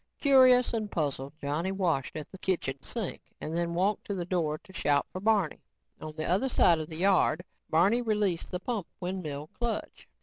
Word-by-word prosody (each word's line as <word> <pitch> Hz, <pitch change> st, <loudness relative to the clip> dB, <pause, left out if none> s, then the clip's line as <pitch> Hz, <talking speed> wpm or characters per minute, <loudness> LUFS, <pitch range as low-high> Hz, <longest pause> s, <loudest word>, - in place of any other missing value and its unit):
Curious 255 Hz, -3 st, +6 dB
and 215 Hz, -2 st, -1 dB
puzzled, 140 Hz, -4 st, -2 dB
Johnny 155 Hz, +6 st, -1 dB
washed 175 Hz, -8 st, 0 dB
at 155 Hz, -2 st, -6 dB
the 190 Hz, -, -11 dB
kitchen 140 Hz, -9 st, -1 dB
sink 220 Hz, +1 st, -4 dB, 0.2 s
and 155 Hz, -, -4 dB
then 170 Hz, 0 st, -1 dB
walked 195 Hz, +4 st, +1 dB
to 200 Hz, -, -3 dB
the 175 Hz, -2 st, -3 dB
door 165 Hz, -4 st, 0 dB
to 190 Hz, +3 st, -18 dB
shout 145 Hz, -5 st, +2 dB
for 185 Hz, -, -6 dB
Barney. 205 Hz, -6 st, +1 dB, 0.4 s
On 155 Hz, -1 st, -7 dB
the 155 Hz, -1 st, -3 dB
other 195 Hz, +10 st, +1 dB
side 170 Hz, -8 st, +4 dB
of 155 Hz, -, -4 dB
the 160 Hz, -, -5 dB
yard, 180 Hz, -2 st, +3 dB, 0.3 s
Barney 195 Hz, +9 st, +4 dB
released 210 Hz, -6 st, 0 dB
the 180 Hz, -, -3 dB
pump 210 Hz, -3 st, -3 dB
windmill 160 Hz, -5 st, -4 dB
clutch. 235 Hz, -3 st, -3 dB
180 Hz, 190 wpm, -29 LUFS, 155-210 Hz, 0.4 s, Curious